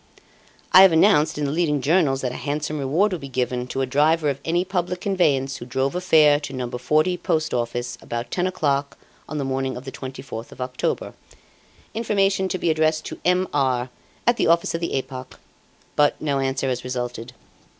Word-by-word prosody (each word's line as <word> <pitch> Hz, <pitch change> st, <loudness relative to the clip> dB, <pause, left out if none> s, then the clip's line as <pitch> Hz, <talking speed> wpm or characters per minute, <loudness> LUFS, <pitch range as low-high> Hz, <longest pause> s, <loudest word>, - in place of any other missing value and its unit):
"I 185 Hz, -, +10 dB
have 190 Hz, -2 st, +8 dB
announced 160 Hz, -3 st, +4 dB
in 150 Hz, -, -1 dB
the 140 Hz, -, -1 dB
leading 155 Hz, -2 st, +1 dB
journals 140 Hz, -2 st, +2 dB
that 125 Hz, -, -2 dB
a -, -, -7 dB
handsome 150 Hz, +1 st, -2 dB
reward 160 Hz, +10 st, +1 dB
will 180 Hz, -, -3 dB
be 140 Hz, -, -7 dB
given 125 Hz, -1 st, -2 dB
to 135 Hz, -, -3 dB
a -, -, +1 dB
driver 150 Hz, +3 st, +2 dB
of 135 Hz, -, -6 dB
any 175 Hz, +2 st, 0 dB
public 180 Hz, -1 st, -2 dB
conveyance 145 Hz, -9 st, +1 dB
who -, -, -8 dB
drove 130 Hz, +2 st, -1 dB
a 180 Hz, -, -2 dB
fare 155 Hz, -5 st, +5 dB
to 145 Hz, -2 st, -7 dB
No. 130 Hz, -2 st, -3 dB
40, 155 Hz, +8 st, +1 dB
Post 155 Hz, -2 st, -1 dB
Office, 120 Hz, 0 st, -2 dB
about 120 Hz, +1 st, -5 dB
ten 180 Hz, 0 st, 0 dB
o'clock 145 Hz, -6 st, -1 dB, 0.3 s
on 155 Hz, -, -4 dB
the 140 Hz, -, -2 dB
morning 135 Hz, -1 st, -2 dB
of 125 Hz, -, -9 dB
the 135 Hz, -, -6 dB
24th 130 Hz, -4 st, -8 dB
of -, -, -14 dB
October. 125 Hz, 0 st, -2 dB, 0.8 s
Information 200 Hz, -4 st, +1 dB
to 185 Hz, -, -1 dB
be 170 Hz, -, +1 dB
addressed 155 Hz, 0 st, +1 dB
to -, -, -7 dB
'M. 180 Hz, +1 st, +2 dB
R.,' 130 Hz, -3 st, 0 dB, 0.3 s
at 240 Hz, 0 st, +3 dB
the -, -, +2 dB
office 170 Hz, +1 st, +3 dB
of 165 Hz, -, -3 dB
the 170 Hz, -, -1 dB
'Epoque'; 130 Hz, -1 st, -6 dB, 0.6 s
but 145 Hz, 0 st, +3 dB
no 145 Hz, -3 st, -1 dB
answer 135 Hz, 0 st, -1 dB
has 125 Hz, -1 st, -2 dB
resulted. 125 Hz, -1 st, -5 dB
145 Hz, 200 wpm, -23 LUFS, 130-170 Hz, 0.8 s, I